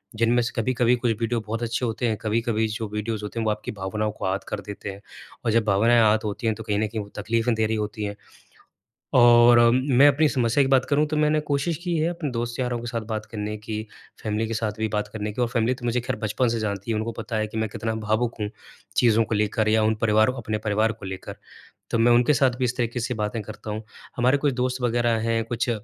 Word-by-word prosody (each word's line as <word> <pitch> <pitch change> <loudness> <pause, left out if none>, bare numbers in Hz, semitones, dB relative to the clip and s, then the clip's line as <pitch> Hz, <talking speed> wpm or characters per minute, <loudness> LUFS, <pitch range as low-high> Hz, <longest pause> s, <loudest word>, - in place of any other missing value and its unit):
जिनमें 115 +2 +3
से 120 - -2
कभी-कभी 125 0 +2
कुछ 120 -1 0
वीडियो 115 +1 0
बहुत 115 +2 -3
अच्छे 120 +2 -1
होते 115 +2 -1
हैं, 110 -2 0
कभी-कभी 110 0 0
जो 110 0 -4
वीडियोज़ 105 0 -3
होते 105 +3 -5
हैं, 115 - -1
वो 110 - +2
आपकी 105 0 -4
भावनाओं 105 +2 -2
को 100 - -6
आहत 95 +1 -1
कर 105 - -3
देते 100 0 -6
हैं, 100 +1 -8 0.4
और 115 - +2
जब 115 +1 +3
भावनाएँ 115 +4 +4
आहत 110 0 +3
होती 105 +2 -3
हैं, 110 - +1
तो 110 - -8
कहीं 105 -1 -1
न 110 - +1
कहीं 110 0 -4
वो 100 - -9
तकलीफ़ें 115 +3 +1
दे 110 - +1
रही 110 - -1
होती 105 0 -3
हैं। 100 0 -3 1.0
और 120 0 +7 0.2
मैं 130 +1 +4
अपनी 145 +2 +3
समस्या 125 +1 +2
की 135 - -1
बात 130 -1 +4
करूँ, 150 +1 +3
तो 155 0 -2
मैंने 150 0 +3
कोशिश 145 +4 0
की 175 -1 0
है 160 - +1
अपने 160 -5 -4
दोस्त-यारों 120 +1 -2
के 120 - -7
साथ 120 -1 -2
बात 110 -1 -3
करने 105 0 -3
की, 105 0 -5 0.4
फ़ैमिली 110 +1 -1
के 115 - -3
साथ 110 -1 -1
भी 110 - 0
बात 105 0 -2
करने 105 -1 -3
की, 110 - -5
और 120 - +1
फ़ैमिली 120 +1 +1
तो 125 - -11
मुझे 120 +1 +1
ख़ैर 125 +1 -3
बचपन 115 +3 0
से 115 -1 -1
जानती 100 0 -3
है। 110 - +1
उनको 110 +2 -2
पता 110 +1 -5
है 110 - 0
कि 110 +1 -6
मैं 110 -1 0
कितना 110 +2 -3
भावुक 115 +2 +1
हूँ, 105 -1 -2 0.5
चीज़ों 115 -2 +4
को 110 - -3
लेकर 105 +1 +1
या 110 0 +3
उन 110 - +2
परिवारों 110 +3 +3
अपने 110 0 -2
परिवार 110 +2 +2
को 110 -3 -10
लेकर। 95 0 -7 0.6
तो 115 - +1
मैं 120 +1 +5
उनके 120 +5 +5
साथ 135 -2 +3
भी 130 - +2
इस 125 0 -1
तरीके 120 0 -1
से 125 +2 -2
बातें 110 0 -2
करता 105 +1 -8
हूँ। 110 +1 -4 0.3
हमारे 125 +3 +3
कुछ 140 -2 0
दोस्त 125 +1 -1
वगैरह 120 -1 +1
हैं, 115 0 +1
कुछ 120 +1 -2
115 Hz, 250 wpm, -24 LUFS, 110-120 Hz, 1.0 s, और